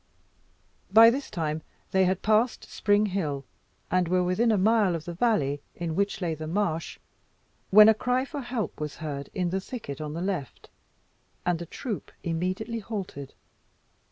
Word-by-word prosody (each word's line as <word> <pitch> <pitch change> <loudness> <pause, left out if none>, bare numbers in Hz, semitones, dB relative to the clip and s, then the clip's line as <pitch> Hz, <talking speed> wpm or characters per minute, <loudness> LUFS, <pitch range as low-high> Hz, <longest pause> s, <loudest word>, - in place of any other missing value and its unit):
By 225 +3 +9
this 270 +3 -4
time 160 -4 -2 0.3
they 190 0 +4
had 185 0 0
passed 220 +3 +2
Spring 205 +1 +2
Hill, 155 -9 -2 0.5
and 180 -1 +2
were 180 +1 +2
within 185 +6 +2
a 215 - +3
mile 205 -2 +3
of 160 -1 -6
the 175 - -5
valley 165 - +1
in 170 -2 -3
which 200 +1 0
lay 170 -3 0
the 155 0 -6
marsh, 165 -2 -1 0.7
when 210 +2 +9
a 220 - +8
cry 250 +4 0
for 290 0 -6
help 240 -3 -4
was 150 -1 -4
heard 140 -3 -5
in 180 -2 0
the 190 +1 -1
thicket 185 - -7
on 150 -1 -4
the 170 - -3
left, 180 -9 -4 0.7
and 175 -2 +1
the 170 - -6
troop 225 - -5
immediately 185 +7 -2
halted. 195 - -6
185 Hz, 165 wpm, -27 LUFS, 165-215 Hz, 0.7 s, By